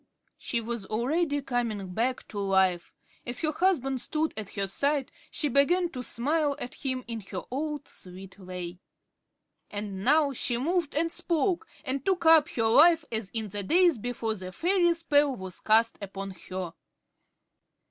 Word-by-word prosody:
She 235 - -1
was 230 -3 -4
already 285 +6 0
coming 220 -8 -2
back 245 +5 -1
to 205 - -5
life. 190 -3 +2 0.3
As 245 +1 -4
her 310 -2 +1
husband 270 -7 +1
stood 315 +1 -1
at 215 -3 -7
her 200 - +1
side, 280 +7 0 0.2
she 300 - -2
began 335 +7 +3
to 255 - -5
smile 285 +5 0
at 245 - -6
him 260 -2 -3
in 230 -2 -4
her 185 - -4
old, 295 +1 -3
sweet 185 +2 -11
way. 180 -1 -7 0.9
And 205 -2 -5
now 300 +1 +4
she 240 -1 -1
moved 325 +3 0
and 330 +2 +1
spoke, 350 +4 0 0.2
and 270 0 -2
took 365 -1 0
up 320 -2 +7
her 225 - -1
life 310 +7 +6
as 220 -3 -3
in 220 -1 -3
the 205 +1 -4
days 335 - +4
before 230 -1 -2
the 185 -3 -7
fairy 345 - +2
spell 290 -4 +2
was 190 -3 -7
cast 225 +1 +3
upon 195 0 -6 0.2
her. 185 -3 -4
250 Hz, 160 wpm, -28 LUFS, 205-310 Hz, 0.9 s, up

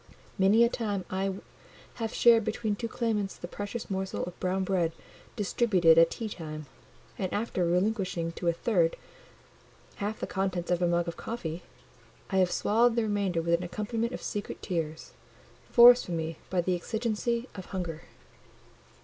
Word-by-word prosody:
Many 200 +5 +5
a - - +6
time 205 -6 -2
I 190 0 -1 0.7
have 225 -1 -1
shared 230 -2 +5
between 220 0 -1
two 230 +3 -4
claimants 215 -4 -1
the 175 - -7
precious 205 +5 -5
morsel 190 -1 -3
of 180 - -7
brown 185 +1 0
bread 180 -4 0 0.4
distributed 195 -6 +4
at 165 0 +6
tea 225 - -4
time; 155 -6 -7 0.5
and 185 -2 -2
after 205 -4 -1
relinquishing 180 -2 0
to 170 +1 -5
a - - +5
third 170 -2 +1 1.0
half 210 +1 -3
the - - -2
contents 190 -3 -2
of 175 0 +1
my 175 - +3
mug 170 0 +1
of 170 - -5
coffee, 175 -8 -5 0.7
I 190 - +1
have 185 -1 +3
swallowed 230 +2 +3
the 235 - +2
remainder 200 -5 0
with 170 0 +1
an 170 - +3
accompaniment 220 +6 -3
of - - -6
secret 205 -1 -5
tears, 160 -3 -3 0.6
forced 245 +1 +8
from 170 -2 -2
me 160 0 -4
by 185 -2 +1
the 180 +1 0
exigency 230 +5 -2
of 190 -3 -8
hunger. 170 -4 -4
190 Hz, 165 wpm, -29 LUFS, 175-220 Hz, 1.0 s, forced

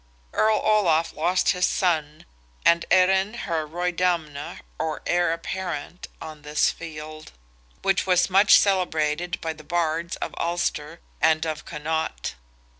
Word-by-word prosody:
Earl 215 0 +3
Olaf 175 -7 +2
lost 180 +4 +1
his 180 0 +2
son, 155 -4 -1 0.4
and 170 0 +4
Erin 190 +3 +3
her 160 -4 -2
Roydamna, 170 -3 -2 0.2
or 155 -1 -3
heir 175 -1 +2
apparent, 175 -1 -5
on 155 -2 -9
this 150 +1 +1
field, 155 -1 -9 0.5
which 195 -1 +1
was 180 -1 +4
much 195 +2 +6
celebrated 175 -3 0
by 160 -1 -3
the 155 -1 -14
Bards 170 +1 -1
of - - -5
Ulster 170 -2 -2 0.2
and 160 0 +3
of 155 -1 -4
Connaught. 150 - -3
165 Hz, 125 wpm, -24 LUFS, 155-180 Hz, 0.5 s, much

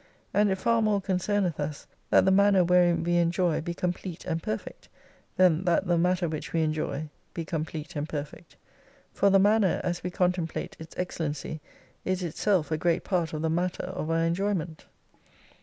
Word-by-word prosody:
And 205 0 +4
it 190 - 0
far 230 +4 +2
more 210 -2 +2
con 190 -1 -1
cemeth 190 -4 0
us 145 0 -4 0.2
that - - +5
the 190 - +4
manner 200 -1 +5
wherein 175 -1 +3
we 175 +1 +1
enjoy 170 -1 +1
be 170 +1 -4
com 180 0 0
plete 180 -2 -8
and 165 0 -2
perfect, 110 -6 -5 0.5
than 180 -2 +4
that 175 +2 +2
the 175 -1 +2
matter 180 +1 +2
which 155 -1 -5
we 165 -1 +2
enjoy 155 -1 -2 0.3
be 165 - -3
complete 155 -1 -4
and 150 +1 -3
perfect. 150 +3 -7 0.6
For 200 - +3
the 195 - +6
manner, 205 -1 +3
as 175 -1 -2
we 180 - -2
con 180 0 +2
template 170 -3 -4
its 160 0 -11
excellency, 155 -3 -3 0.4
is 185 0 -1
itself 175 0 0
a 155 - 0
great 170 0 +1
part 175 -4 0
of 155 0 -4
the_matter 175 +3 0
of 160 -4 -4
our 165 0 +2
enjoyment. 170 -2 -2
175 Hz, 185 wpm, -27 LUFS, 160-185 Hz, 0.6 s, the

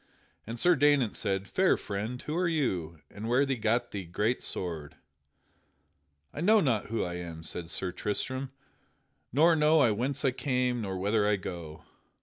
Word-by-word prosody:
And 115 +1 -5
Sir 175 +7 +4
Daynant 145 -5 +3
said, 95 0 -2
"Fair 190 0 +3
friend, 105 +5 -4
who 150 - -3
are 180 +1 +1
you, 90 - -1
and 110 +3 -6
where 130 +4 +4
gat 120 -3 0
ye 100 -2 -3
that 110 +7 0
sword?" 80 -5 -4 1.4
"I 150 - -5
know 215 +5 +5
not 125 - +1
who 115 +1 -1
I 90 -1 -4
am," 85 -2 -7
said 80 +1 -4
Sir 90 +1 -2
Tristram, 130 +8 -3 0.8
"nor 160 +6 +5
know 155 +1 +4
I 120 -6 +5
whence 130 +7 -2
I 135 - +4
came 125 -2 0
nor 95 -3 -3
whither 105 +2 +1
I 105 - +3
go. 85 -5 -7
115 Hz, 165 wpm, -29 LUFS, 95-140 Hz, 1.4 s, know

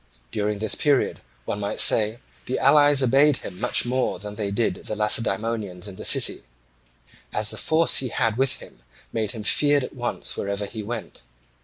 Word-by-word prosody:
During 105 0 -2
this 110 +1 +1
period, 145 -3 0 0.2
one 105 - -4
might 100 -1 -3
say, 110 +1 +5 0.3
the 130 - -2
allies 145 0 +4
obeyed 135 +2 +3
him 90 - -9
much 125 - +1
more 125 +1 -1
than 105 0 -8
they 105 -1 -4
did 110 +3 -2
the 110 - -3
Lacedaemonians 105 -3 -1
in 100 - -9
the - - -9
city, - - +4 0.9
as 105 0 0
the - - -6
force 160 +1 +3
he 130 - -1
had 115 -2 -1
with 135 +2 +1
him - - -15 0.3
made 110 -2 -2
him 110 -3 -7
feared 145 +4 +3
at - - -7
once 120 -3 -2
wherever 100 +1 -3
he 110 +2 -7
went. 110 +1 -7
115 Hz, 180 wpm, -23 LUFS, 105-130 Hz, 0.9 s, say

